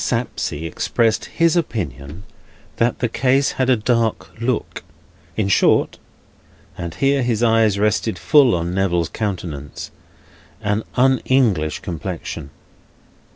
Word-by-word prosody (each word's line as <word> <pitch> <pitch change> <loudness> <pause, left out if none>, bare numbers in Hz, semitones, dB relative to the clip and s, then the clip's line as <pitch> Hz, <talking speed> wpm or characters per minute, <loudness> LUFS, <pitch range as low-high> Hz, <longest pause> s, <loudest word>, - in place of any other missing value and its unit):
Sapsea 80 +3 -2
expressed 110 +7 0
his 165 0 +1
opinion 80 - -3 0.5
that 120 +1 +1
the 120 - 0
case 130 +4 +2
had 130 -1 0
a 130 - +6
dark 115 0 -1
look; 120 -1 -2 0.6
in 105 -3 +1
short 100 - +3 0.8
(and 85 -2 -6
here 140 0 +2
his 120 -2 0
eyes 110 -3 +3
rested 105 0 0
full 125 - +4
on 85 +1 -2
Neville's 90 -3 0
countenance), 85 -9 -5 0.7
an 105 0 -1
Un 130 +1 +3
English 100 - +1
complexion. 80 -5 -5
110 Hz, 115 wpm, -20 LUFS, 85-125 Hz, 0.8 s, a